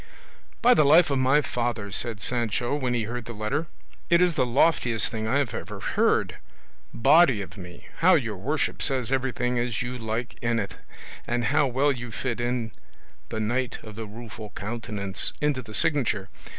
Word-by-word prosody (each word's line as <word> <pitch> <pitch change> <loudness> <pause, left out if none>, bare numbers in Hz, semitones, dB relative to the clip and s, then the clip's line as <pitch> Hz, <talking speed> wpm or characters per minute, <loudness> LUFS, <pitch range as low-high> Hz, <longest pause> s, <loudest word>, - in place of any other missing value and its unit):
"By 245 +1 +7
the 155 - +5
life 155 +2 +6
of 135 - +1
my 135 +3 +4
father," 120 -6 -3
said 110 +1 -2
Sancho, 120 +1 -1
when 130 -4 -1
he 115 - 0
heard 120 +2 -5
the 120 - -7
letter, 135 +10 -2 0.4
"it 170 0 +5
is 180 -1 +3
the 130 -5 +1
loftiest 120 -4 +2
thing 110 -1 -4
I 140 +5 +2
ever 115 -5 -5
heard. - - +1 0.5
Body 135 -1 +5
of - - -12
me! 90 -3 -11
how - - +5
your - - -1
worship - - -2
says 130 -3 0
everything 125 -2 0
as 120 -1 -1
you 125 +1 -5
like 115 +2 -4
in 120 0 +1
it! 100 -3 -4 0.5
And 120 0 0
how 145 +1 +3
well 135 +3 +2
you 125 -2 -5
fit 120 +2 -3
in 120 -2 -2 0.6
'The 110 - -3
Knight 120 +3 -1
of 110 - -9
the 110 0 -6
Rueful 110 0 -9
Countenance' 105 -2 -2
into 145 -3 0
the 110 -3 -8
signature. 125 - +2
120 Hz, 175 wpm, -26 LUFS, 110-135 Hz, 0.6 s, By